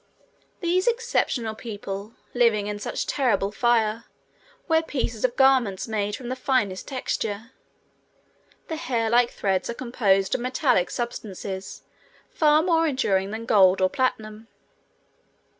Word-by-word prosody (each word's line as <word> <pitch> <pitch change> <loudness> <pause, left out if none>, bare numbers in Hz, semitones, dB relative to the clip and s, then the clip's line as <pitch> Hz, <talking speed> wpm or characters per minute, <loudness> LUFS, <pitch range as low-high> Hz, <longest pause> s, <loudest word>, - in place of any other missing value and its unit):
These 360 +3 +1
exceptional 465 - 0
people, 205 -1 -7 0.2
living 230 -4 +3
in 205 0 -4
such - - -3
terrible 205 -7 +1
fire, 230 0 +1 0.6
wear 320 -2 +3
pieces 245 -8 -3
of 250 -1 +1
garments 255 -8 +3
made 210 -2 -2
of 250 - -8
the 255 - -2
finest 255 -8 -1
texture. 230 -3 -3 1.2
The 320 - -4
hair 235 -8 -1
like 240 0 +4
threads 190 -2 -1
are 235 - -3
composed 200 -7 +1
of - - 0
metallic 255 - +1
substances 200 -5 -6 0.5
far 305 0 +4
more 330 -2 +2
enduring 195 -9 0
than 220 +2 -5
gold 190 -4 +5
or 185 0 +2
platinum. 220 -4 -2
230 Hz, 125 wpm, -24 LUFS, 205-260 Hz, 1.2 s, gold